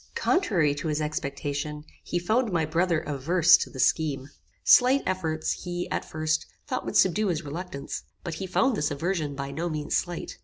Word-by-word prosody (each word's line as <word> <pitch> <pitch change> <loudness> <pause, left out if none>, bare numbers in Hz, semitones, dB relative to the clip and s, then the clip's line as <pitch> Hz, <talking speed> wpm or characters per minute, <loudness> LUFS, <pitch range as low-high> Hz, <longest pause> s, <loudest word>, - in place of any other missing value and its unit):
Contrary 175 - +2
to 145 +3 -4
his 150 -1 0
expectation 150 0 -3 0.2
he 175 - -2
found 220 +6 +1
my 165 -3 +1
brother 165 +1 +1
averse 165 +4 +4
to - - -1
the 130 - -10
scheme. 145 -1 +1 0.3
Slight 260 +2 +6
efforts, 160 -4 -2
he, 175 0 -3
at - - -2
first, 155 0 -1 0.2
thought 260 -4 -3
would - - 0
subdue 195 +3 +3
his 165 -5 -1
reluctance; 145 -2 -5 0.2
but 170 - -4
he 190 - -3
found 250 +7 +2
this 150 -7 0
aversion 155 -1 -2
by 140 0 -4
no 170 +4 -2
means 150 -2 -2
slight. 175 -1 -3
160 Hz, 180 wpm, -27 LUFS, 150-180 Hz, 0.3 s, Slight